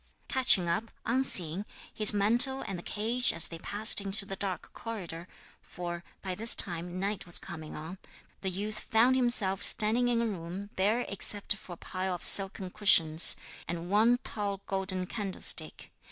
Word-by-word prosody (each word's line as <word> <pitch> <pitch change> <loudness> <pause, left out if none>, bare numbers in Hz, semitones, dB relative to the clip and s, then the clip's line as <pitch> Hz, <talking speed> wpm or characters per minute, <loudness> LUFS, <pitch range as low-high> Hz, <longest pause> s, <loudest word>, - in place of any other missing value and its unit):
Catching 250 -9 +3
up, 195 +7 -3 0.2
unseen, 200 -8 +3 0.3
his 215 -1 +6
mantle 235 +6 +2
and 195 -4 -7
the - - -9
cage 230 +7 -2
as 165 0 0
they 165 - -10
passed 205 +3 +1
into 200 +1 -5
the 195 - -7
dark 190 -2 -7
corridor 180 -7 -8 0.3
for 175 -1 -9 0.2
by 190 -2 -5
this 225 +5 -1
time 175 0 0
night 200 0 -5
was 175 - -1
coming 155 -2 -10
on 165 +5 -10 0.4
the 190 - -3
youth 205 +4 -5
found 235 +4 +1
himself 240 -7 0
standing 225 +3 +4
in 240 -1 -1
a 235 - -2
room 195 0 -8
bare 215 +6 -1
except 200 +1 +3
for 190 -3 -13
a - - -13
pile 185 +1 -5
of 175 - -9
silken 190 -1 +4
cushions, 165 -6 +4 0.3
and 175 +1 -7
one 225 +4 +2
tall 200 -2 -5
golden 190 -1 -4
candlestick. 195 -1 -1
195 Hz, 165 wpm, -28 LUFS, 180-220 Hz, 0.4 s, his